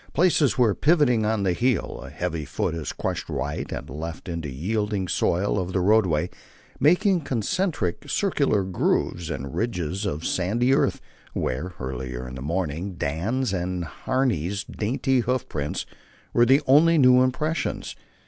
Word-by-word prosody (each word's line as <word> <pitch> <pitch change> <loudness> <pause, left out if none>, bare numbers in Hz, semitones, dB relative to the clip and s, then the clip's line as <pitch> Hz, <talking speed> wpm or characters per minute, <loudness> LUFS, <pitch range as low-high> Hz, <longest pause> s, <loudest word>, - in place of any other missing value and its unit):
Places 160 -5 +3
where, 120 -5 +4
pivoting 135 - +3
on 110 -2 0
the 95 -2 +2
heel, 125 +5 0
a 70 - -9
heavy 80 +2 -3
foot 75 - -2
had 80 -3 -5
crushed - - -3
right 70 +3 -3
and - - -5
left 80 +3 -6
into 85 -3 -4
the 65 - -8
yielding 105 +4 -1
soil 95 +4 +1
of 90 0 -3
the 95 - +2
roadway, 90 -4 +3 0.5
making 180 - +4
concentric, 130 - -1
circular 140 - +1
grooves 90 -2 0
and 70 -2 -5
ridges 100 -3 -2
of 80 -3 -3
sandy 115 +8 +1
earth, - - +1 0.3
where, 80 +9 -2
earlier 65 -1 -5
in 65 - -8
the 65 - -7
morning 85 +4 -2
Dan's 95 - -1
and 90 -1 -2
Harney's 100 - -1
dainty 130 +4 0
hoof 125 +1 -1
prints 75 -1 -3 0.5
were 120 0 +5
the 135 +4 +5
only 160 +5 +6
new 125 -3 +6
impressions. 150 +6 -1
100 Hz, 150 wpm, -25 LUFS, 80-130 Hz, 0.5 s, only